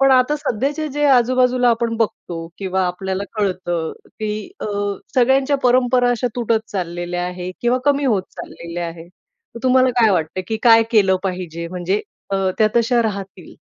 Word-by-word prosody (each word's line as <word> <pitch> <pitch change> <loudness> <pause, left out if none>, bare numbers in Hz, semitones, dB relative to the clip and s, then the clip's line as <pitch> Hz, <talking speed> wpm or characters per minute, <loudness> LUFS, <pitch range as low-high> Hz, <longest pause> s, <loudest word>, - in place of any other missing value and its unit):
पण 270 0 +5
आता 260 +3 +4
सध्याचे 290 +3 -2
जे 295 +1 -1
आजू-बाजूला 250 -1 +3
आपण 230 0 0
बघतो 175 -7 -3
किंवा 190 -1 -1
आपल्याला 190 +2 -3
कळतं 185 -5 -1 0.3
की 215 +5 -3
अ, - - -4 0.5
सगळ्यांच्या 265 +3 +3
परंपरा 245 0 +3
अशा 245 0 0
तुटत 230 -2 +1
चाललेल्या 175 -1 -3
आहेत 180 0 -6
किंवा 240 +1 +2
कमी 285 0 +3
होत 215 -8 +2
चाललेल्या 170 0 -6
आहेत. 165 +1 -9 0.4
तर - - -6
तुम्हाला 255 0 +4
काय 225 -2 +5
वाटतंय 170 +2 -1
की 220 - -1
काय 225 -1 +7
केलं 195 -4 +4
पाहिजे 175 -3 -4
म्हणजे 185 +3 -1 0.3
अ, 195 -1 +1
त्या 215 -1 +5
तश्या 235 +1 +3
राहतील? 195 -5 -5
215 Hz, 160 wpm, -20 LUFS, 180-250 Hz, 0.5 s, काय